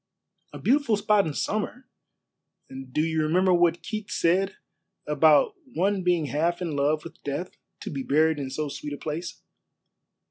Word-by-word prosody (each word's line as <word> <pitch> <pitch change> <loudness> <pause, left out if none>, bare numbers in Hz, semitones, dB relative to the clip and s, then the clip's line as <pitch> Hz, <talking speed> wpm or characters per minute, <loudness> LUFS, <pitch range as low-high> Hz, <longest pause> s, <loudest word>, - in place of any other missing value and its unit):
"A - - -8
beautiful 265 -5 +2
spot 205 -2 +3
in 150 - -4
summer. 230 +5 -3 1.0
Do 150 - +1
you 160 -1 0
remember 180 +4 +3
what 175 -1 +2
Keats 215 -2 -5
said 190 +4 +2 0.5
about 480 -4 +4 0.2
one 195 +2 +1
being 175 -3 +1
half 165 +5 0
in 170 -5 -3
love 150 +2 +1
with - - -12
death 145 +6 -4 0.3
to - - -5
be 140 -3 -3
buried 155 +3 +2
in 135 -2 -4
so 150 +3 -3
sweet 145 +1 -6
a - - -5
place?" 160 +4 -6
170 Hz, 155 wpm, -26 LUFS, 150-195 Hz, 1.0 s, about